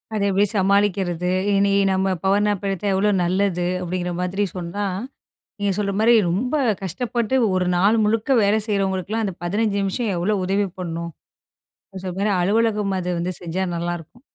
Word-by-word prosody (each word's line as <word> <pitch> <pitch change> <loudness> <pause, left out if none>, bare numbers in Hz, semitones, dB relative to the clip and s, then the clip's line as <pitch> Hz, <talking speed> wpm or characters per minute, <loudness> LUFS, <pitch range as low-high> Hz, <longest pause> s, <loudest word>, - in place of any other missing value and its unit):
அதெப்படி 200 -1 +2
சமாளிக்கிறது? 190 -3 +1 0.2
இனி 200 0 +3 0.2
நம்ம 190 0 +1 0.6
எடுத்தா 195 +1 -2
எவ்வளோ 200 +2 +2
நல்லது? 180 0 0 0.2
அப்படிங்கிற 180 0 -3
மாதிரி 190 +3 -1
சொன்னா 180 +3 -3 0.8
நீங்க 200 -1 +1
சொல்ற 200 -1 0
மாதிரி 230 +2 +5 0.2
ரொம்ப 230 - -1 0.3
கஷ்டப்பட்டு 235 +6 -2 0.2
ஒரு 185 -1 +1
நாள் 200 +5 +4
முழுக்க 225 +5 +2
வேலை 205 +2 +3
செய்றவங்களுக்கெல்லாம் 200 +1 -1
இந்த 190 - -4
15 205 +3 0
நிமிஷம் 200 +2 -1
எவ்வளோ 200 +5 0
உதவி 200 +2 +1
பண்ணும். 170 -1 -4 0.9
சொன்ன 185 -1 -4
மாதிரி 205 +1 +1
ப்ப 185 - +1
அலுவலகம் 210 0 +1
அது 180 0 -3
வந்து 180 +2 -2
செஞ்சா 175 +2 -3
நல்லாயிருக்கும். 175 +6 -5
195 Hz, 140 wpm, -22 LUFS, 180-210 Hz, 0.9 s, மாதிரி